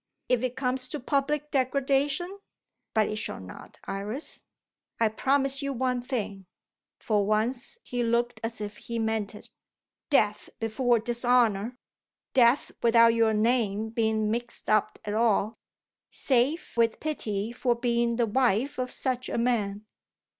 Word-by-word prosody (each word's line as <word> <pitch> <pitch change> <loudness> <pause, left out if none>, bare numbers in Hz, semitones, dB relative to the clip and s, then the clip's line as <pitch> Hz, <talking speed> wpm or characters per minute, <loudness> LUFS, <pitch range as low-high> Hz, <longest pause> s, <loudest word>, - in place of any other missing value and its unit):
If 250 -2 +3
it 255 -1 -2
comes 255 -1 -1
to 300 - -5
public 295 +3 -1
degradation 275 +7 +1 0.6
but 215 -1 +4
it 215 - -3
shall 215 - -4
not. 95 -1 -11
Iris, 210 +9 -2 0.6
I 225 -1 +4
promise 270 +4 +2
you 280 0 -2
one 250 0 0
thing." 205 -7 -4 0.5
For 210 -2 +1
once 225 - 0
he 245 -1 -3
looked 235 0 0
as 225 0 -3
if 210 0 -5
he 235 - -5
meant 220 -2 -1
it. - - -13 0.6
"Death 210 -8 +2
before 235 +2 +2
dishonour. 240 -1 +1 0.6
Death 245 +1 +4
without 230 0 +6
your 225 -1 +3
name 220 -1 +1
being 220 -1 0
mixed 235 -1 -3
up 215 -1 +2
at 205 - -2
all, 220 -1 +1 0.5
save 270 +5 +1
with 230 -1 +2
pity 220 -8 -2
for 240 0 0
being 235 -1 +1
the 235 0 +2
wife 255 +4 +1
of 255 0 -1
such 255 -1 -2
a - - -2
man." 215 -4 0
235 Hz, 140 wpm, -27 LUFS, 220-255 Hz, 0.6 s, without